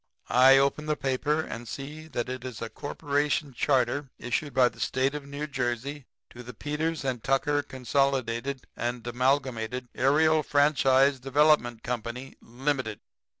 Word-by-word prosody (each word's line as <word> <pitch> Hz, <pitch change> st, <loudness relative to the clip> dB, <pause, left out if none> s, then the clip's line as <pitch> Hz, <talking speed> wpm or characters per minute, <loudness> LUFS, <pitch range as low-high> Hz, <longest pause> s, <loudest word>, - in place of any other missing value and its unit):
"I 130 Hz, +2 st, +7 dB
open 140 Hz, +3 st, +1 dB
the 150 Hz, -, +1 dB
paper 145 Hz, +3 st, 0 dB
and 120 Hz, -6 st, -7 dB
see 150 Hz, +6 st, -7 dB
that 120 Hz, -6 st, -3 dB
it 130 Hz, 0 st, -5 dB
is 125 Hz, -4 st, -6 dB
a 115 Hz, -, -5 dB
corporation 145 Hz, 0 st, -1 dB
charter 135 Hz, +2 st, +1 dB
issued 140 Hz, +4 st, -2 dB
by 125 Hz, -1 st, +4 dB
the -, -, -18 dB
State 130 Hz, +2 st, 0 dB
of 145 Hz, -1 st, -6 dB
New 140 Hz, +1 st, -4 dB
Jersey 135 Hz, 0 st, -3 dB, 0.2 s
to 120 Hz, -, -10 dB
'The 125 Hz, -1 st, -10 dB
Peters 150 Hz, +3 st, -2 dB
& 120 Hz, -, -17 dB
Tucker 145 Hz, +2 st, +1 dB
Consolidated 135 Hz, -1 st, -1 dB
and 120 Hz, 0 st, -3 dB
Amalgamated 125 Hz, -1 st, -1 dB
Aerial 155 Hz, +4 st, +3 dB
Franchise 140 Hz, -2 st, +3 dB
Development 135 Hz, -3 st, +2 dB
Company, 125 Hz, +2 st, -5 dB
Limited.' 130 Hz, -3 st, -2 dB
135 Hz, 145 wpm, -27 LUFS, 125-145 Hz, 0.2 s, I